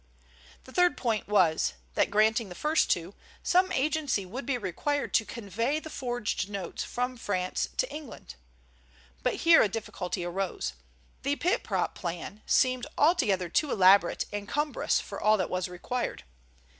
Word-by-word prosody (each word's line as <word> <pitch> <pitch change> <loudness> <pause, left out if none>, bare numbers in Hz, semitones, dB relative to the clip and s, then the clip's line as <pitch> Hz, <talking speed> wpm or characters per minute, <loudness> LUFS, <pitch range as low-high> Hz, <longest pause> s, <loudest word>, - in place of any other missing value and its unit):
The 260 - -14
third 355 0 +3
point 225 -4 -1
was 180 -6 +3 0.2
that, - - +2
granting 215 +1 +2
the 180 - -9
first 310 - +1
two, 175 +2 0 0.3
some 370 +1 +3
agency 290 - 0
would 240 +7 -7
be 275 -3 +1
required 245 - -2
to 220 - +3
convey 230 - -2
the 315 0 -9
forged 240 -6 -2
notes 195 -4 -4
from 250 +1 -3
France 185 -5 -2
to - - 0
England. 300 -5 -9 0.9
But - - 0
here 335 0 +8
a 210 - +3
difficulty 190 -4 -4
arose. 185 +2 -3 0.5
The 280 +1 0
pit 355 +5 +1
prop - - -1
plan 175 +4 -6
seemed 255 +1 +2
altogether 215 - +3
too 290 - +1
elaborate 190 -2 +5
and 205 -1 -4
cumbrous 295 0 0
for - - -7
all 215 +1 +4
that 185 - -2
was 185 0 -1
required. 180 +8 -4
220 Hz, 155 wpm, -29 LUFS, 190-285 Hz, 0.9 s, here